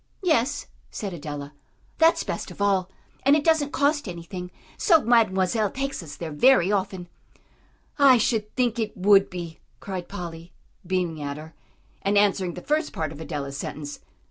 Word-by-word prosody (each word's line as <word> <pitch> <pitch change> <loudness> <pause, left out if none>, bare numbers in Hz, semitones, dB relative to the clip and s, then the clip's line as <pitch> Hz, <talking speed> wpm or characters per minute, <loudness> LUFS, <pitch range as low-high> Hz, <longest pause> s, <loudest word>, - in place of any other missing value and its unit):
"Yes," 290 -5 +1 0.2
said 200 -3 -5
Adela, 145 -3 -6 0.5
"that's 325 +1 +5
best - - -4
of - - -12
all, 195 -2 +2 0.3
and 275 +2 +5
it 300 - +1
doesn't 315 -3 +2
cost 290 -2 +1
anything; 180 +1 -7 0.3
so 330 -8 +4
Mademoiselle 215 -2 +3
takes 275 0 -3
us 155 -4 -9
there 165 -2 -6
very 195 - +4
often." 190 -3 -2 0.9
"I 270 -3 +7
should 220 -2 0
think 245 -3 +1
it 215 -2 -3
would 195 +1 +5
be," 170 -3 -7 0.2
cried 185 -3 -6
Polly, 170 -3 -7 0.3
beaming 175 -4 -1
at 140 0 -4
her, 160 +1 -10 0.5
and 200 +1 +1
answering 195 -3 +2
the 180 - -8
first 305 +2 0
part 155 -2 -3
of 155 0 -9
Adela's 140 -4 -5
sentence. 145 0 -6
190 Hz, 160 wpm, -25 LUFS, 170-245 Hz, 0.9 s, I